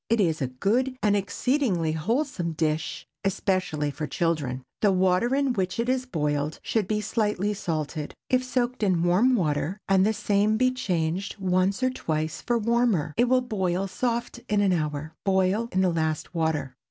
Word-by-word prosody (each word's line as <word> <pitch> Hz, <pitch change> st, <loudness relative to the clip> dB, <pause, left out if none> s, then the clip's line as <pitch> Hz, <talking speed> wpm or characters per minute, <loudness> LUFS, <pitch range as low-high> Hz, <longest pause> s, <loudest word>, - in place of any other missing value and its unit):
It 230 Hz, 0 st, +2 dB
is 165 Hz, -6 st, +1 dB
a 130 Hz, -, +1 dB
good 235 Hz, -, 0 dB
and 205 Hz, -1 st, +4 dB
exceedingly 200 Hz, -, 0 dB
wholesome 180 Hz, -, -1 dB
dish, 155 Hz, 0 st, -2 dB, 0.2 s
especially 185 Hz, -6 st, 0 dB
for 150 Hz, +1 st, -4 dB
children. 145 Hz, -8 st, -1 dB, 0.2 s
The 205 Hz, -, +4 dB
water 190 Hz, +7 st, +2 dB
in 275 Hz, -2 st, +1 dB
which 190 Hz, -1 st, -2 dB
it 235 Hz, -, 0 dB
is 255 Hz, 0 st, 0 dB
boiled 150 Hz, -, -1 dB
should 215 Hz, -5 st, 0 dB
be 210 Hz, 0 st, 0 dB
slightly 210 Hz, -1 st, 0 dB
salt. 160 Hz, -5 st, -3 dB, 0.3 s
If 255 Hz, 0 st, +2 dB
soaked 250 Hz, -1 st, -1 dB
in 185 Hz, -5 st, +2 dB
warm 200 Hz, +9 st, +4 dB
water, 160 Hz, -1 st, 0 dB
and 195 Hz, -1 st, +4 dB
the 215 Hz, +2 st, +2 dB
same 205 Hz, +1 st, +1 dB
be 255 Hz, +2 st, +3 dB
changed 185 Hz, -6 st, -2 dB
once 190 Hz, +3 st, +1 dB
or 255 Hz, -, +3 dB
twice 155 Hz, -9 st, -3 dB
for 240 Hz, -1 st, +1 dB
warmer, 225 Hz, -9 st, +1 dB
it 240 Hz, -, +4 dB
will 255 Hz, 0 st, +4 dB
boil 190 Hz, -6 st, -1 dB
soft 235 Hz, +5 st, -2 dB
in 210 Hz, -1 st, +2 dB
an 200 Hz, -2 st, +3 dB
hour. 155 Hz, -1 st, -2 dB
Boil 195 Hz, +4 st, +1 dB
in 185 Hz, -, +1 dB
the 185 Hz, -2 st, +2 dB
last 160 Hz, 0 st, -2 dB
water. 160 Hz, -5 st, -1 dB
190 Hz, 175 wpm, -26 LUFS, 160-230 Hz, 0.3 s, and